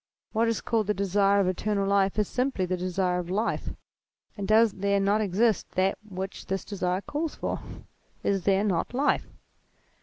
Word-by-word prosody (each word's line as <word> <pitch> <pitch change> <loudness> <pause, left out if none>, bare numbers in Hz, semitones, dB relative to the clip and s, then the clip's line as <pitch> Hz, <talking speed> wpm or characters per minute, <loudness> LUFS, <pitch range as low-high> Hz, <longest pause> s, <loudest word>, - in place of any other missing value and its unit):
"What 230 +1 +2
is 230 - 0
called 220 -3 0
the 210 - +1
desire 200 +1 +3
of 195 - +2
eternal 200 +2 0
life 200 0 +2
is 210 -2 +2
simply 250 -7 0
the 185 +1 -1
desire 180 0 0
of 175 -1 -5
life; 210 +5 -1 0.7
and 200 -2 -4
does 220 +1 +5
there 200 +1 +1
not 200 +2 +2
exist 215 +2 +1
that 190 +1 +1
which 190 0 -6
this 195 0 -2
desire 185 -2 -1
calls 300 +7 -3
for? - - -3 0.6
Is 195 -3 0
there 195 0 +3
not 200 +3 -1
life 280 +3 +1
200 Hz, 175 wpm, -27 LUFS, 185-215 Hz, 0.7 s, does